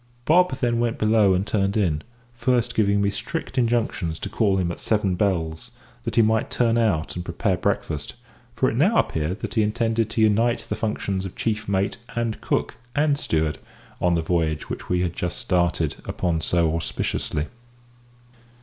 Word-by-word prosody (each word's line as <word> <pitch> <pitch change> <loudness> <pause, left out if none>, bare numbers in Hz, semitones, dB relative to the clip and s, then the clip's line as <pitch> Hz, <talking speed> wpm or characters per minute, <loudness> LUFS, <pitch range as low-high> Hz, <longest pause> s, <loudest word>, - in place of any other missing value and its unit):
Bob 175 -4 +4
then 120 -3 +1
went 120 -1 0
below 105 -3 +4
and 95 +2 0
turned 100 -1 0
in, 80 -8 +1 0.3
first 120 0 +1
giving 100 -1 +2
me 100 - +2
strict 155 +9 -5
injunctions 115 -9 0
to - - -5
call 100 -4 +2
him 90 -2 0
at - - -7
"seven 105 -4 +1
bells," 90 0 -1 0.4
that 115 -1 -3
he 115 - +6
might 110 +1 +2
turn 115 -2 +2
out 100 -9 +1
and 90 - -4
prepare 90 +3 0
breakfast, 75 -3 -2 0.4
for 130 - +2
it - - -1
now 185 - +3
appeared 80 +6 0
that - - -4
he 110 - +3
intended 115 +1 +1
to 110 - -3
unite 115 +3 +3
the - - -4
functions 100 -3 -2
of 95 - -7
chief 110 -2 -2
mate 100 0 0 0.2
and 115 -2 -2
cook - - 0 0.2
and 145 -1 +2
steward, 80 - 0 0.4
on 90 -1 +3
the 80 - 0
voyage 80 -2 0 0.2
we 90 0 +2
had 90 -1 -1
just 90 0 -3
started 85 -4 0
upon 85 -3 -1
so 80 -1 +1
auspiciously. 75 -2 -2
100 Hz, 175 wpm, -24 LUFS, 85-115 Hz, 0.4 s, he